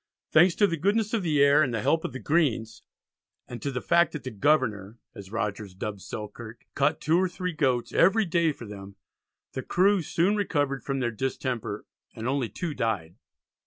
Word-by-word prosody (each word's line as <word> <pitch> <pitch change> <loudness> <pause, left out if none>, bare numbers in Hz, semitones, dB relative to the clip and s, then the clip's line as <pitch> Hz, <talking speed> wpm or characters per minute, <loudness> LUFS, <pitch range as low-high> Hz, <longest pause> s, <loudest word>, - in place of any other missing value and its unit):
Thanks 170 +2 +5
to 205 - +4
the 170 -4 -1
"goodness 205 +6 +1
of 225 - +1
the 150 -5 +3
air" 140 +2 +5
and 135 -5 +1
the 110 -3 -2
"help 160 0 +2
of - - -3
the 130 - -6
greens," 120 -5 0 0.7
and 120 - -8
to 140 - -2
the 130 -2 -4
fact 170 -2 +3
that 150 - -6
the 130 - -5
"Governour," 110 -4 +1 0.2
as 100 -1 -11
Rogers 105 -3 -3
dubbed 100 +1 -5
Selkirk, 110 +3 -8
caught 145 +3 +1
two 165 +3 +2
or 185 0 +1
three 180 0 -4
goats 130 -6 0
every 210 +5 +4
day 170 -2 +2
for 120 - -10
them, 100 -1 -10 0.6
the 130 - -4
crew 190 +7 +2
soon 175 +5 +1
recovered 145 -9 0
from 135 -1 -2
their 120 -1 0
distemper, 120 -3 -3 0.3
and 115 +2 -5
only 130 -3 0
two 170 -4 -4
died. 100 - -2
135 Hz, 195 wpm, -27 LUFS, 110-170 Hz, 0.7 s, Thanks